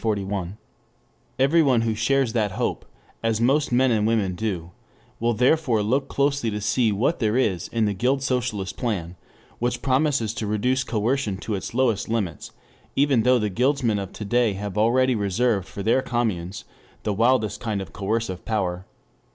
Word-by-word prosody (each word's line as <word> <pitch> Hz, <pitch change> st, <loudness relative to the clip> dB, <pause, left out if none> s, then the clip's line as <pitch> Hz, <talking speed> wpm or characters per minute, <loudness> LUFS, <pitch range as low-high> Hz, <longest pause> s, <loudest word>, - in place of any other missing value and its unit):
] -, -, -39 dB
Everyone 135 Hz, -3 st, +4 dB
who 115 Hz, -1 st, 0 dB
shares 120 Hz, +2 st, +1 dB
that 105 Hz, -5 st, 0 dB
hope, 120 Hz, +3 st, -2 dB, 0.4 s
as 115 Hz, -1 st, 0 dB
most 135 Hz, +5 st, +2 dB
men 130 Hz, +1 st, +3 dB
and 110 Hz, -2 st, +2 dB
women 105 Hz, -5 st, +1 dB
do, 90 Hz, -4 st, -3 dB, 0.5 s
will 115 Hz, 0 st, +1 dB
therefore 125 Hz, -2 st, +2 dB
look 130 Hz, +6 st, 0 dB
closely 140 Hz, -3 st, 0 dB
to 105 Hz, -1 st, -3 dB
see 110 Hz, +2 st, +1 dB
what 120 Hz, +11 st, 0 dB
there 110 Hz, -1 st, +1 dB
is 95 Hz, -9 st, 0 dB
in 115 Hz, -2 st, 0 dB
the 105 Hz, -, 0 dB
Guild 130 Hz, +7 st, 0 dB
Socialist 125 Hz, -7 st, -2 dB
plan 95 Hz, -8 st, -3 dB, 0.4 s
which 120 Hz, 0 st, -1 dB
promises 130 Hz, -5 st, +1 dB
to 110 Hz, -, -4 dB
reduce 125 Hz, +5 st, +1 dB
coercion 115 Hz, -2 st, -1 dB
to 105 Hz, +3 st, -4 dB
its 100 Hz, +3 st, -4 dB
lowest 120 Hz, -6 st, +1 dB
limits, 100 Hz, -9 st, -3 dB, 0.4 s
even 135 Hz, -4 st, +3 dB
though 125 Hz, +2 st, +4 dB
the 105 Hz, -3 st, -1 dB
Guildsmen 125 Hz, -1 st, +1 dB
of 100 Hz, -1 st, -6 dB
to 105 Hz, -, -6 dB
day 120 Hz, 0 st, +2 dB
have 100 Hz, 0 st, -5 dB
already 125 Hz, +4 st, +3 dB
reserved 105 Hz, -1 st, 0 dB
for 100 Hz, -, -7 dB
their 115 Hz, +5 st, +3 dB
communes 105 Hz, -8 st, -2 dB, 0.4 s
the 105 Hz, -, 0 dB
widest 110 Hz, -1 st, +2 dB
kind 110 Hz, -4 st, -2 dB
of 95 Hz, -, -8 dB
coercive 100 Hz, -2 st, -2 dB
power. 95 Hz, -4 st, -2 dB
115 Hz, 170 wpm, -24 LUFS, 105-125 Hz, 0.5 s, Everyone